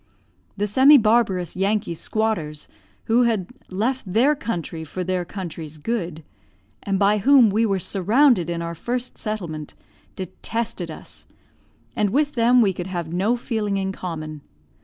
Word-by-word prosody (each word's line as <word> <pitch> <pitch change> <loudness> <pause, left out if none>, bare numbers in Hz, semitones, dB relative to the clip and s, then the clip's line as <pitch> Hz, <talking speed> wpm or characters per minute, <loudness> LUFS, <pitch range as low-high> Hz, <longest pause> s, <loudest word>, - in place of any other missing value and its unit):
The 205 - 0
semi 265 +8 +7
barbarous 215 - +2
Yankee 195 -1 0
squatters, 165 -6 -2 0.4
who 230 +2 +3
had 225 -6 +1 0.2
"left 220 +2 -2
their 250 +9 +4
country 175 - -4
for 180 +4 -5
their 185 0 -1
country's 165 -5 -7
good," 170 -2 -3 0.6
and 195 -1 -1
by 205 +2 +3
whom 255 -1 +6
we 225 +3 +2
were 195 -2 +1
surrounded 200 - +3
in 170 0 -2
our 170 0 -4
first 245 +8 -4
settlement, 170 -9 -5 0.4
detested 190 0 -4
us, 155 - -10 0.7
and 210 -1 +1
with 290 +7 +1
them 240 -1 +4
we 195 -3 +2
could 175 0 -5
have 170 -3 -4
no 205 +7 +1
feeling 215 -5 -2
in 190 0 -1
common. 155 -5 -6
200 Hz, 145 wpm, -23 LUFS, 175-230 Hz, 0.7 s, semi